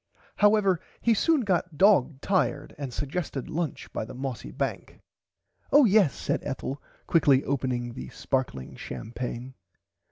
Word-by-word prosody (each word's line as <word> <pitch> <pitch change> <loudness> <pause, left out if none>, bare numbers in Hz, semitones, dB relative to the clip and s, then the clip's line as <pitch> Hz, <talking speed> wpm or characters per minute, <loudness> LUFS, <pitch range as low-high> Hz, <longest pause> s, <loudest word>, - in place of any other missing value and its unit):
However 205 -4 +4 0.2
he 235 - +3
soon 310 +7 +3
got 180 -6 -1
dog 155 -7 +4
tired 145 -7 0
and 140 -3 -4
sugested 145 +1 -4
lunch 165 -3 -3
by - - -2
the 110 - -9
mossy 130 - -5
bank. - - -4 0.7
Oh 290 -1 +7
yes 200 - +4
said - - -1
Ethel 135 0 -4 0.2
quickly 140 -5 +4
opening 125 -3 -2
the 125 - -7
sparkling 125 - -3
champaigne. 120 - -6
145 Hz, 130 wpm, -27 LUFS, 125-190 Hz, 0.7 s, Oh